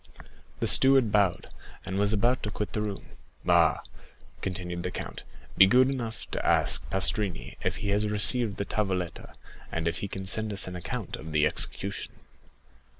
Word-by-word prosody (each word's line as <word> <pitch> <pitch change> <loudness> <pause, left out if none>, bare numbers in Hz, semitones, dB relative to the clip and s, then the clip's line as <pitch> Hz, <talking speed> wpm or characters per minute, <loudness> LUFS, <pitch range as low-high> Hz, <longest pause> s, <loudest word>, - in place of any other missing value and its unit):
The - - -1
steward 135 -4 +6
bowed, 100 -4 +1 0.3
and 95 +2 -3
was 100 0 +2
about 120 +4 +1
to 105 - -3
quit 105 -1 -5
the 105 - -1
room. 105 -2 -5 0.4
"Ah!" - - +3 0.6
continued 90 -2 -4
the 90 - -3
count, - - -7 0.4
"be 95 - +9
good 130 +6 +4
enough 115 -4 -5
to - - -3
ask - - +3
Pastrini 95 - -2
if - - -1
he 100 - -4
has 105 +1 +1
received 105 +1 +3
the 100 - -3
tavoletta, 95 -4 -3 0.4
and 80 0 -2
if 85 -1 -2
he 100 - -4
can 95 0 -6
send 110 +3 0
us 100 - +2
an 90 - -7
account 90 -2 -5
of 80 0 -9
the 75 -1 +3
execution." 100 +5 -2
100 Hz, 170 wpm, -27 LUFS, 90-105 Hz, 0.6 s, be